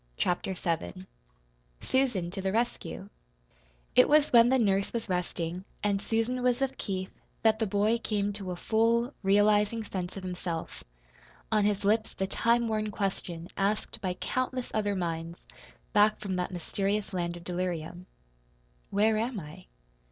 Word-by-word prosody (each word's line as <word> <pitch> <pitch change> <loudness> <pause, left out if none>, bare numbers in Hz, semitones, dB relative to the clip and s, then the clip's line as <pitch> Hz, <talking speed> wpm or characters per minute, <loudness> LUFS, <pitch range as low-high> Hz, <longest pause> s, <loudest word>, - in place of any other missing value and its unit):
CHAPTER 185 +2 0
VII 95 - -3 0.7
SUSAN 245 -10 0
TO 195 - -4
THE 190 0 0
RESCUE 220 -3 -2 0.8
It - - +7
was 300 -2 +4
when 235 0 +8
the 265 - +4
nurse 200 -4 +2
was 230 -2 -3
resting 180 -1 -2 0.2
and 200 -1 +1
Susan 225 +4 0
was 250 0 +2
with 270 -1 -1
Keith 190 -1 -3 0.3
that 220 -1 +4
the 220 - +1
boy 210 +4 +2
came 205 -2 -1
to 195 -2 -5
a 180 - -2
full, 230 +6 +2
realizing 205 +2 +3
sense 185 -2 -5
of 195 - -6
himself, 180 -2 -4 0.7
on 210 -1 +3
his 205 -1 +1
lips 215 +2 +2
the 190 - -1
time 235 +4 +2
worn 215 -1 -1
question 185 -4 -3
asked 205 +2 -1
by 185 -2 -1
countless 255 +4 -2
other 205 -2 +1
minds 165 -1 -3 0.6
back 210 +1 +5
from 195 -3 -3
that 180 - -1
mysterious 195 +3 -2
land 175 -1 -2
of 170 - -11
delirium: 175 -1 -3 0.8
"Where 215 +2 +3
am 230 -1 -1
I?" 170 +3 -11
200 Hz, 150 wpm, -29 LUFS, 180-220 Hz, 0.8 s, when